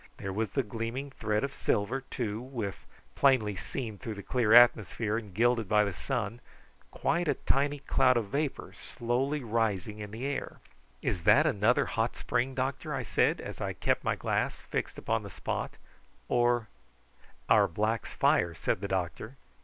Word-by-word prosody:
There 95 Hz, 0 st, -5 dB
was 110 Hz, +2 st, -1 dB
the 135 Hz, -, 0 dB
gleaming 115 Hz, +5 st, -4 dB
thread 105 Hz, -4 st, -1 dB
of 140 Hz, 0 st, -2 dB
silver, 115 Hz, +2 st, 0 dB
too, 115 Hz, -4 st, -4 dB
with, 120 Hz, -6 st, -5 dB, 0.3 s
plainly 115 Hz, -, +3 dB
seen 110 Hz, -2 st, -5 dB
through 115 Hz, -4 st, -5 dB
the 100 Hz, -, -8 dB
clear 120 Hz, -4 st, +1 dB
atmosphere 115 Hz, -2 st, +5 dB
and 110 Hz, -3 st, -4 dB
gilded 115 Hz, +1 st, +2 dB
by 105 Hz, -1 st, +5 dB
the 100 Hz, -2 st, -2 dB
sun, 115 Hz, +2 st, -3 dB, 0.5 s
quite 170 Hz, 0 st, 0 dB
a 145 Hz, -, +2 dB
tiny 145 Hz, +1 st, +1 dB
cloud 135 Hz, -2 st, +3 dB
of 110 Hz, -4 st, -2 dB
vapour 145 Hz, +2 st, -2 dB
slowly 130 Hz, +5 st, -2 dB
rising 110 Hz, -3 st, -1 dB
in 105 Hz, -1 st, -6 dB
the 115 Hz, +5 st, -6 dB
air. 140 Hz, 0 st, -4 dB, 0.4 s
"Is 90 Hz, -, -1 dB
that 155 Hz, -, +6 dB
another 120 Hz, -4 st, +3 dB
hot 115 Hz, +2 st, -1 dB
spring, 125 Hz, +2 st, -1 dB
doctor?" 130 Hz, +1 st, -2 dB
I -, -, -2 dB
said, -, -, +2 dB
as -, -, -7 dB
I -, -, -2 dB
kept -, -, 0 dB
my -, -, +1 dB
glass -, -, -1 dB
fixed -, -, -4 dB
upon -, -, -1 dB
the -, -, -8 dB
spot; -, -, -4 dB, 0.5 s
"or 120 Hz, -2 st, +2 dB, 0.4 s
" -, -, -30 dB
"Our -, -, +5 dB
blacks' 110 Hz, +6 st, -1 dB
fire," 85 Hz, -1 st, +2 dB
said 85 Hz, -, -1 dB
the 100 Hz, -, -2 dB
doctor. 95 Hz, -, -3 dB
115 Hz, 170 wpm, -30 LUFS, 105-130 Hz, 0.5 s, that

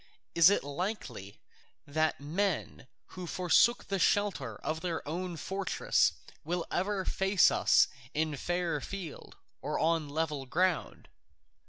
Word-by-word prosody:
Is 170 Hz, +1 st, +7 dB
it 200 Hz, -, +1 dB
likely 140 Hz, -, -5 dB, 0.5 s
that 155 Hz, +2 st, 0 dB
men 160 Hz, -1 st, -2 dB, 0.2 s
who 180 Hz, -1 st, -7 dB
forsook 185 Hz, +8 st, +3 dB
the 195 Hz, -1 st, -2 dB
shelter 165 Hz, -, +1 dB
of 160 Hz, +1 st, -3 dB
their 165 Hz, -4 st, -3 dB
own 175 Hz, +2 st, -4 dB
fortress 190 Hz, +3 st, +1 dB, 0.3 s
will 175 Hz, +2 st, -2 dB
ever 190 Hz, +1 st, -1 dB
face 195 Hz, -1 st, +3 dB
us -, -, +4 dB, 0.2 s
in 155 Hz, 0 st, -1 dB
fair 175 Hz, 0 st, -1 dB
field 185 Hz, -3 st, -7 dB, 0.3 s
on 160 Hz, -2 st, 0 dB
level 150 Hz, -3 st, -2 dB
ground? 180 Hz, +5 st, 0 dB
170 Hz, 120 wpm, -31 LUFS, 150-185 Hz, 0.5 s, Is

